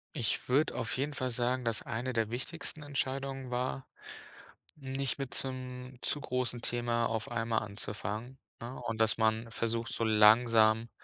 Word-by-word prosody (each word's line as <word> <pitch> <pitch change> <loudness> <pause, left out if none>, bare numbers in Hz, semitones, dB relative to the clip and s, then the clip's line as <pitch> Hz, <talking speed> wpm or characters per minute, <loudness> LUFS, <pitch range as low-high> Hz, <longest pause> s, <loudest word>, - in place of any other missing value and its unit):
Ich 120 -4 0
würde 145 +5 +2
auf 115 - -1
jeden 145 +3 -1
Fall 130 -2 -2
sagen, 125 +2 +1
dass 115 -3 -1
eine 120 +3 -3
der 115 -3 0
wichtigsten 150 +5 -4
Entscheidungen 135 -2 -3
war, 125 +2 -2 0.9
nicht 135 -1 -1
mit 135 -2 -5
so 135 - +2
'nem 125 0 -8
zu 145 - +4
großen 125 -2 -1
Thema 120 0 0
auf 115 -1 -2
einmal 115 -1 0
anzufangen, 105 +4 -5 0.2
ne? 120 +3 -6
Und 115 0 -4
dass 110 -1 +5
man 110 +1 +1
versucht, 115 0 -1
so 115 - 0
langsam 110 +1 +5
120 Hz, 160 wpm, -32 LUFS, 115-130 Hz, 0.9 s, dass